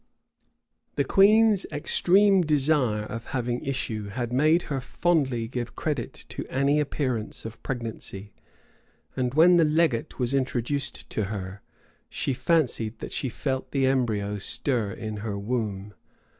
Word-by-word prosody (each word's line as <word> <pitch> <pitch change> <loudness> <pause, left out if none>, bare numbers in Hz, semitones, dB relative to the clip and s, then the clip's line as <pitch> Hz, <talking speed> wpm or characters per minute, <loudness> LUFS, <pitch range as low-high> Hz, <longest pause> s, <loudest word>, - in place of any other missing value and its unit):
The - - +2
queen's 210 0 +5
extreme 185 +6 +3
desire 145 -8 +2
of 115 +1 -7
having 120 0 -2
issue 115 -6 -3
had 120 +3 -4
made 155 +6 +4
her 140 -3 -3
fondly 135 -6 0
give 120 -1 -5
credit 145 -6 -3
to - - -5
any 140 +3 +2
appearance 130 -8 -2
of 110 0 -8
pregnancy; 110 -5 -6 0.8
and 125 0 -1
when 175 +3 +7
the 170 - +5
legate 155 -6 +1
was 125 0 0
introduced 130 +1 -1
to 110 - -1
her, 100 -1 -6 0.5
she 135 - -1
fancied 125 -6 0
that - - -7
she 130 - -1
felt 130 +2 -3
the 135 -2 +1
embryo 110 -6 0
stir 115 0 0
in 110 +1 -5
her 105 -1 -4
womb. 105 -2 -3
125 Hz, 135 wpm, -26 LUFS, 110-150 Hz, 0.8 s, when